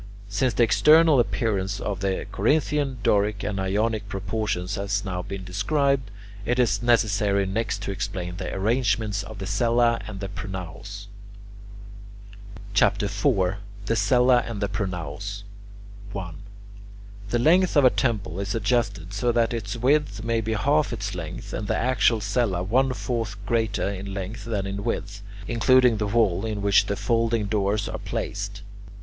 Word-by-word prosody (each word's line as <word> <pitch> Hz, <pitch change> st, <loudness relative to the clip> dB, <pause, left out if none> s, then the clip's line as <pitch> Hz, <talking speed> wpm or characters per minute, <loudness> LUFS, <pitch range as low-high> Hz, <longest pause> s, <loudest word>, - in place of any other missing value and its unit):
Since 105 Hz, +3 st, 0 dB
the 120 Hz, -, +4 dB
external 150 Hz, -, +6 dB
appearance 100 Hz, -5 st, 0 dB
of 100 Hz, -3 st, -3 dB
the 95 Hz, -1 st, -1 dB
Corinthian, 145 Hz, +3 st, +1 dB
Doric, 105 Hz, 0 st, +2 dB
and 100 Hz, -2 st, -2 dB
Ionic 105 Hz, +2 st, -1 dB
proportions 95 Hz, -1 st, -2 dB
has 100 Hz, 0 st, -1 dB
now 90 Hz, -2 st, -3 dB
been 100 Hz, 0 st, -6 dB
described, 130 Hz, +7 st, 0 dB, 0.3 s
it 120 Hz, +3 st, 0 dB
is 105 Hz, -6 st, +2 dB
necessary 105 Hz, -4 st, +2 dB
next 105 Hz, +1 st, -2 dB
to 100 Hz, -, -3 dB
explain 95 Hz, -3 st, -4 dB
the -, -, -4 dB
arrangements 105 Hz, -1 st, 0 dB
of 110 Hz, -, -9 dB
the 95 Hz, -, -5 dB
cella 115 Hz, +3 st, +2 dB
and 100 Hz, -3 st, -7 dB
the 100 Hz, -, -4 dB
pronaos. 100 Hz, +1 st, -7 dB, 1.7 s
CHAPTER -, -, +3 dB
IV 100 Hz, -2 st, +1 dB, 0.3 s
THE 115 Hz, -, +1 dB
CELLA 125 Hz, +4 st, +4 dB
AND 115 Hz, -3 st, -5 dB
PRONAOS 100 Hz, +1 st, -4 dB, 0.7 s
1. 90 Hz, -5 st, -5 dB, 0.9 s
The 120 Hz, -, +1 dB
length 170 Hz, +7 st, +4 dB
of 140 Hz, -, +6 dB
a 125 Hz, -, +7 dB
temple 105 Hz, -7 st, -1 dB
is 100 Hz, +2 st, -2 dB
adjusted 100 Hz, -6 st, 0 dB
so 120 Hz, +4 st, +1 dB
that 115 Hz, 0 st, +1 dB
its 110 Hz, -1 st, -4 dB
width 135 Hz, -1 st, +1 dB
may 115 Hz, 0 st, 0 dB
be 110 Hz, 0 st, -2 dB
half 145 Hz, +7 st, +2 dB
its 100 Hz, -3 st, -4 dB
length, 85 Hz, -4 st, -6 dB
and 105 Hz, -, -3 dB
the -, -, 0 dB
actual 115 Hz, -2 st, +2 dB
cella 100 Hz, -3 st, 0 dB
one 130 Hz, +7 st, +2 dB
fourth 115 Hz, -4 st, -3 dB
greater 110 Hz, -4 st, 0 dB
in 100 Hz, 0 st, -5 dB
length 100 Hz, +4 st, -5 dB
than 105 Hz, -4 st, -2 dB
in 100 Hz, +1 st, -4 dB
width, 100 Hz, 0 st, -3 dB, 0.3 s
including 125 Hz, 0 st, +4 dB
the 105 Hz, 0 st, -1 dB
wall 100 Hz, -3 st, +2 dB
in 105 Hz, -2 st, -3 dB
which 100 Hz, -1 st, +4 dB
the 100 Hz, -, -1 dB
folding 115 Hz, -1 st, +1 dB
doors 100 Hz, 0 st, 0 dB
are -, -, -5 dB
placed. -, -, -4 dB
105 Hz, 155 wpm, -25 LUFS, 100-120 Hz, 1.7 s, a